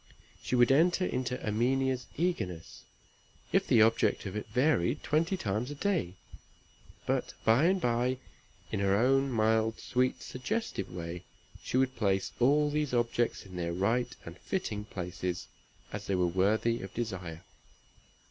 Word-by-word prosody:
She - - -1
would 120 +1 +5
enter 175 +6 +4
into 125 -3 -2
Erminia's 130 +4 +1
eagerness, 115 - -3 0.7
if - - +2
the 110 - +6
object 115 0 +2
of 95 - -5
it 105 - -4
varied 125 - +1
twenty 165 +5 +1
times 110 - -2
a 145 - -5
day; 145 - -1 0.9
but - - -1
by 115 +7 +5
and 190 +2 +3
by, 125 -2 +1 0.5
in 105 - -1
her 100 0 +3
own 135 +4 +3
mild, 110 0 +2
sweet, 125 +1 0
suggestive 205 - -3
way, 85 0 -6 0.4
she - - -2
would 130 0 +2
place 95 -4 0
all 145 +4 +4
these 150 -3 0
objects 120 -1 0
in 95 -2 -9
their 85 -1 -2
right 115 +7 0
and 85 +2 -9
fitting 105 - -3
places, 90 -2 -4 0.5
as 105 0 -5
they 100 - +1
were 90 -1 +2
worthy 105 +6 +1
of 95 - -7
desire. 90 -8 -4
115 Hz, 150 wpm, -30 LUFS, 95-130 Hz, 0.9 s, the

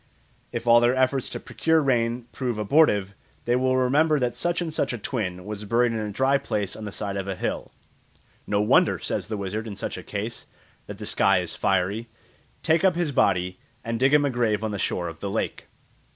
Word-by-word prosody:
If - - -4
all 120 0 +7
their 120 +2 +3
efforts 130 0 +1
to - - -5
procure 160 0 +1
rain 120 -4 +1
prove 125 -4 -3
abortive, 105 -4 +3 0.3
they 120 - +2
will 130 +1 +2
remember 150 +5 +3
that 125 -3 -1
such 175 0 0
and 165 -3 -3
such - - 0
a - - -3
twin 95 -6 -4
was 105 0 -6
buried 115 +3 +2
in 115 - -2
a 105 -1 -3
dry 135 +6 +2
place 105 -6 -2
on 110 - -7
the 105 - -5
side 100 -1 -4
of 100 0 -4
a 95 - -2
hill. - - -3 0.8
"No 105 0 +1
wonder," 105 - +4
says - - -3
the 110 -1 -3
wizard 105 +3 -4
in 105 - -6
such - - -4
a - - -7
case, - - -5 0.4
"that 105 - -7
the 105 - -7
sky 100 -2 +3
is 90 -2 -3
fiery. 100 +6 0 0.6
Take 165 +2 +2
up 190 -3 +4
his 170 -4 0
body 90 -7 +1 0.2
and 115 0 -3
dig 135 +3 +4
him 145 -1 +4
a 140 - 0
grave 110 -4 0
on 110 - -1
the 100 - -4
shore 90 -1 -1
of 80 -1 -8
the 100 - -4
lake." - - -3
115 Hz, 220 wpm, -25 LUFS, 100-130 Hz, 0.8 s, all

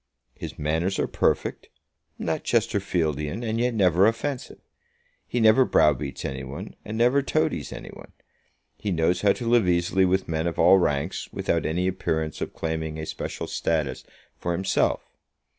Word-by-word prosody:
His - - -8
manners 80 +6 0
are - - +1
perfect; - - -1 0.5
not - - -2
Chesterfieldian, 80 - 0
and 110 +1 -1
yet 120 0 +1
never 95 -1 +4
offensive. 125 +4 -2 0.7
He 120 - -1
never 110 +3 +6
browbeats 75 - +1
any 65 0 -4
one, 70 +2 -8
and 110 +1 -5
never 125 +4 +4
toadies 155 - -1
any - - -8
one. - - -13 0.7
He 105 - -3
knows 85 +2 +1
how 100 -1 +4
to 120 - -5
live 115 -6 +4
easily 90 +2 +2
with 95 +1 +1
men 80 0 -1
of 85 - -3
all 95 +3 +6
ranks, 75 +1 -1
without - - -1
any 90 +4 0
appearance 80 -4 -2
of - - -4
claiming 80 -1 -3
a 80 - -4
special - - -5
status 75 -6 -1 0.4
for 85 - -1
himself. 95 +2 +1
90 Hz, 160 wpm, -25 LUFS, 80-110 Hz, 0.7 s, never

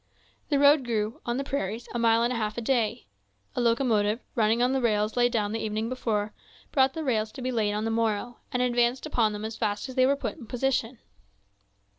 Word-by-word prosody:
The 290 - +2
road 285 0 +6
grew, 225 -2 -2
on 240 +1 0
the 275 - -1
prairies, 240 -5 -3
a 240 - -1
mile 230 0 +4
and 240 +1 +1
a - - -3
half 215 -1 -2
a - - -1
day. 230 - 0 0.5
A - - 0
locomotive, 230 -3 +2
running 225 0 +2
on 250 +1 +2
the 265 - +1
rails 215 -2 +1
laid 245 0 +3
down 210 -4 0
the 225 - -2
evening 220 +1 -2
before, 215 -4 -2 0.4
brought 265 -1 +3
the 320 - -3
rails 220 -6 0
to - - -8
be 255 - -1
laid 215 -4 0
on 210 +1 -2
the 225 - 0
morrow, 225 +1 -1
and 250 0 +1
advanced 245 +1 +1
upon 220 -3 +1
them 210 +1 -5
as 220 0 -5
fast 210 +2 -2
as - - -6
they 255 0 +4
were 280 - +3
put 280 - -4
in 245 -7 -11
position. 250 -1 -1
235 Hz, 225 wpm, -27 LUFS, 215-255 Hz, 0.5 s, road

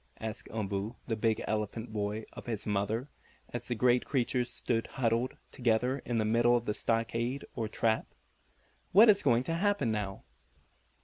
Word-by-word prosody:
asked 110 -1 -5
Umboo 105 +1 -3
the 115 - -1
big 110 0 +1
elephant 110 +1 -2
boy 105 +1 -2
of - - -10
his 115 -4 -3
mother, 105 +5 -1 0.4
as 120 0 -5
the 120 - -1
great 125 +1 +3
creatures 125 -2 0
stood 115 -2 -1
huddled 120 0 0
together 125 +2 +1
in 120 - -1
the 110 - +2
middle 120 +2 +4
of 120 - -4
the 105 - 0
stockade, 115 +4 -1
or 110 - -2
trap. 110 +1 0 0.9
"What 215 +5 +9
is 200 -1 +6
going 120 -3 +3
to 165 - -2
happen 195 - +1
now?" 100 -3 -3
115 Hz, 165 wpm, -31 LUFS, 110-125 Hz, 0.9 s, What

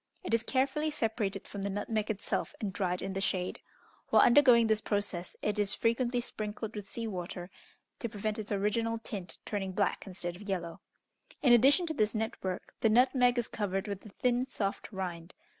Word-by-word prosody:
It 360 - -3
is 230 - +4
carefully 275 +5 +1
separated 220 -8 -2
from 200 - -6
the 200 - -1
nutmeg 210 +2 -2
itself, 220 -1 -2
and 200 -3 -3
dried 180 -2 -1
in 195 0 -3
the 195 - -2
shade. 185 -2 -1 0.5
While - - +7
undergoing 245 -3 +7
this 220 -1 +2
process, 205 -5 -1
it 210 0 0
is 205 -1 +2
frequently 240 +1 +1
sprinkled 215 -1 -5
with 205 -1 -6
sea 230 - -4
water, 180 -3 -5 0.5
to 235 - -3
prevent 215 0 -3
its 215 0 -6
original 220 +3 +1
tint 205 -5 -6
turning 195 -3 -3
black 200 +1 0
instead 175 -2 -4
of 200 +3 -10
yellow. 170 -3 -3 0.6
In 250 -4 +7
addition 275 +9 +6
to 320 - -2
this 215 -5 +1
net 220 +1 -1
work, 185 -1 -4
the 225 - +4
nutmeg 245 +1 +4
is 240 - 0
covered 195 -1 -2
with 200 -1 -5
a 215 - -10
thin, 250 +4 0
soft 200 -5 -3
rind. 180 -3 -5
210 Hz, 190 wpm, -31 LUFS, 195-235 Hz, 0.6 s, While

